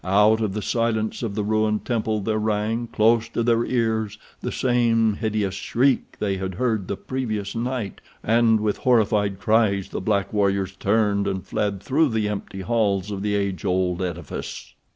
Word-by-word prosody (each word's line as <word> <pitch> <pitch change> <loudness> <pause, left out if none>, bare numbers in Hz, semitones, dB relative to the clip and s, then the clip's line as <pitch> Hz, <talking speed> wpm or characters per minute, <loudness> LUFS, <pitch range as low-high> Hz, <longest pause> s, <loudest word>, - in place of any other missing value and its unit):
Out 105 +4 +4
of 105 -3 -1
the 105 - -3
silence 115 -2 0
of 110 -4 -3
the 105 - -1
ruined 110 0 0
temple 110 -3 -1
there 110 +2 0
rang, 110 +2 -1
close 115 +1 +2
to 115 - -1
their 115 0 +3
ears, 110 -4 -1 0.2
the - - -4
same 115 -3 +2
hideous 105 -2 -1
shriek 125 +6 0
they 100 -2 -1
had 95 -1 -4
heard 110 -4 0
the 100 - -3
previous 110 -6 -3
night, 120 -2 -3 0.2
and 115 0 +4
with 105 -1 0
horrified 105 -5 +2
cries 105 -3 +2
the - - -4
black 100 -1 0
warriors 100 -2 +1
turned 100 -1 +1
and 95 -1 -3
fled 100 -2 -2
through 150 +3 +2
the 110 -2 0
empty 100 -2 -5
halls 105 -2 0
of 100 -1 -4
the 105 0 0
age 100 -2 -2
old 90 -1 0
edifice. 85 -4 -5
105 Hz, 175 wpm, -23 LUFS, 100-115 Hz, 0.2 s, Out